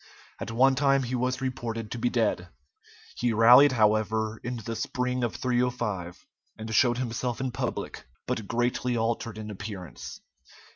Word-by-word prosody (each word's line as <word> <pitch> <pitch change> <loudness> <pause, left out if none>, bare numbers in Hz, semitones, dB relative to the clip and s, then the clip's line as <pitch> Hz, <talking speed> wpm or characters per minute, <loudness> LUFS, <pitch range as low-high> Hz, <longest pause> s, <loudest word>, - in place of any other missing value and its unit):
At - - -5
one 130 +4 +4
time 135 0 +3
he 125 +1 -4
was 125 +1 -1
reported 115 -4 -4
to 120 - -4
be 120 +1 +1
dead. 110 -7 0 0.7
He 120 -1 +1
rallied, 125 +5 +7
however, 110 -1 +1
in 120 +1 -3
the 115 +1 -5
spring 125 +2 -2
of 115 -7 -1
305, 120 -6 -2 0.3
and 110 0 -6
showed 120 +2 +4
himself 120 -1 -2
in 130 -1 -2
public, 125 - -4 0.2
but 110 -2 -3
greatly 120 +1 0
altered 115 -1 -2
in 110 0 -6
appearance. 100 -3 -8
120 Hz, 150 wpm, -27 LUFS, 110-125 Hz, 0.7 s, rallied